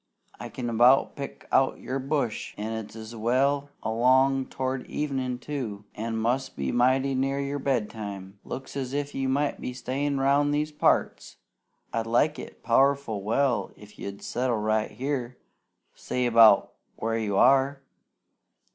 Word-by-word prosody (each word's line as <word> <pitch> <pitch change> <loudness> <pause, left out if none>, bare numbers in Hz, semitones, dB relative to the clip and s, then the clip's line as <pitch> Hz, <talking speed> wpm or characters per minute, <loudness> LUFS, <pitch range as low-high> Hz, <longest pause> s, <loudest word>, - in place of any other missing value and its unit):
I - - -6
can 125 -2 -5
about 120 +3 +4
pick 140 -1 -8
out 135 - +3
your 135 +2 -3
bush, 135 -4 -2
an' 110 +2 -3
it's 110 +1 -7
well 135 +5 +1
along 130 +4 +3
towards 130 0 -3
evenin', 130 -4 -2
too, 125 -7 -5
an' 115 +1 -3
must 120 +4 -1
be 70 -1 -2
mighty 130 +2 +2
near 135 +1 0
your 140 +1 -2
bedtime. 105 -7 -3
Looks 135 - -7
as 135 -2 -3
if 145 0 -2
you 135 -1 -1
might 145 +2 0
be 125 - -4
stayin' 135 +3 -2
round 145 +2 +3
these 150 +1 -1
parts! 150 - 0 0.6
I'd 115 0 -1
like 150 +7 +2
it - - -10
powerful 135 -3 +2
well 120 +5 +1
if 105 0 -15
you'd 100 0 -7
settle 125 -1 -1
right 110 0 0
here, 130 0 -4 0.6
say 125 -1 -2
'bout 115 -3 +6 0.2
where 115 +1 -2
you 100 -3 -1
are. 135 +2 +4
130 Hz, 145 wpm, -26 LUFS, 115-140 Hz, 0.6 s, bout